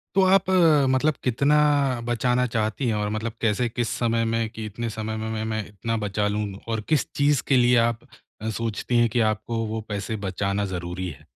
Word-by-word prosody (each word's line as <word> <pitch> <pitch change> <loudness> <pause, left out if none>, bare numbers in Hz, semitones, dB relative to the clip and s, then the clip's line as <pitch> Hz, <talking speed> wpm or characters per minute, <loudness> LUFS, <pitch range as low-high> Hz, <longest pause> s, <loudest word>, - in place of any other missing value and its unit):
तो 195 - +5
आप 190 0 +4
अ, 165 -6 +5
मतलब 140 +4 +2
कितना 140 +4 +2 0.5
बचाना 125 +1 +1
चाहती 115 +2 -1
हैं? 110 - +1
और 105 0 -1
मतलब 110 +2 -3
कैसे 115 +2 +1
किस 120 0 -2
समय 115 -1 +1
में 115 0 0
कि 110 -1 -7
इतने 115 +2 -4
समय 110 0 -4
में 110 0 -4
में - - -3
,मैं 110 0 -3
मैं 110 -1 -2
इतना 115 +3 -3
बचा 105 -1 -1
लूँ? 105 +1 -1 0.2
और 110 -1 -2
किस 155 -3 +1
चीज़ 145 -1 +2
के 135 - +4
लिए 125 0 +4
आप 115 +3 -4 0.4
अ, 110 - -2
सोचती 115 +2 -2
हैं 120 -1 +4
कि 120 - 0
आपको 115 +1 -3
वो 110 0 -3
पैसे 105 +2 -3
बचाना 100 +2 -1
ज़रूरी 90 +1 -4
है? 75 - -12
115 Hz, 210 wpm, -24 LUFS, 105-125 Hz, 0.5 s, तो